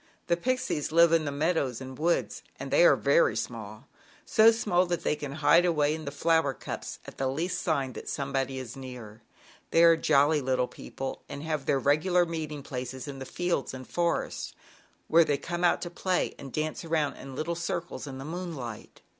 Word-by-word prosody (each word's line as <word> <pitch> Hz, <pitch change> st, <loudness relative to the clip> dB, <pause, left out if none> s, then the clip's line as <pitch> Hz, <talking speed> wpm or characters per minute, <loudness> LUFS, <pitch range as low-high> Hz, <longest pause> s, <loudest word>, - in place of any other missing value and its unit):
The 170 Hz, -, +2 dB
Pixies 255 Hz, -, -1 dB
live 170 Hz, +1 st, +6 dB
in 165 Hz, -2 st, +3 dB
the 145 Hz, -, -2 dB
meadows 145 Hz, -4 st, 0 dB
and 130 Hz, 0 st, -8 dB
woods, 170 Hz, +5 st, 0 dB, 0.2 s
and -, -, -6 dB
they -, -, +5 dB
are -, -, +7 dB
very -, -, +3 dB
small, -, -, -6 dB, 0.4 s
so 220 Hz, 0 st, +6 dB
small 185 Hz, -5 st, +1 dB
that 175 Hz, -1 st, -2 dB
they -, -, +1 dB
can 145 Hz, -2 st, -6 dB
hide 160 Hz, +3 st, +5 dB
away 150 Hz, -4 st, +2 dB
in 155 Hz, 0 st, -6 dB
the 140 Hz, -, -4 dB
flower 160 Hz, -2 st, +2 dB
cups -, -, -6 dB
at -, -, -11 dB
the 135 Hz, -, +1 dB
least 165 Hz, +7 st, -2 dB
sign 140 Hz, -6 st, 0 dB
that -, -, -7 dB
some 140 Hz, -1 st, -3 dB
body 135 Hz, 0 st, -1 dB
is 125 Hz, -3 st, -6 dB
near. 125 Hz, -5 st, -9 dB, 0.5 s
They 165 Hz, -, +5 dB
are 165 Hz, -1 st, +8 dB
jolly 150 Hz, -1 st, +3 dB
little 130 Hz, -1 st, +1 dB
people 135 Hz, +1 st, -7 dB
and 140 Hz, +1 st, -6 dB
have 155 Hz, -3 st, -3 dB
their 140 Hz, -, +3 dB
regular 155 Hz, +7 st, +3 dB
meeting 155 Hz, -3 st, -5 dB
places 130 Hz, 0 st, -6 dB
in 140 Hz, -1 st, -7 dB
the 130 Hz, -, -7 dB
fields 175 Hz, -7 st, -2 dB
and 130 Hz, -1 st, -9 dB
forests, 170 Hz, -1 st, -1 dB, 0.5 s
where 165 Hz, +1 st, +6 dB
they 145 Hz, -3 st, 0 dB
come 175 Hz, +4 st, -4 dB
out 175 Hz, -, +3 dB
to 175 Hz, -, -5 dB
play 185 Hz, +1 st, 0 dB
and 135 Hz, -, -8 dB
dance 155 Hz, +4 st, -2 dB
around 160 Hz, -3 st, 0 dB
in 145 Hz, +6 st, -4 dB
circles, 170 Hz, -2 st, -4 dB
in 135 Hz, -1 st, -7 dB
the 135 Hz, -, -7 dB
moonlight. 155 Hz, -, -6 dB
155 Hz, 195 wpm, -28 LUFS, 135-170 Hz, 0.5 s, are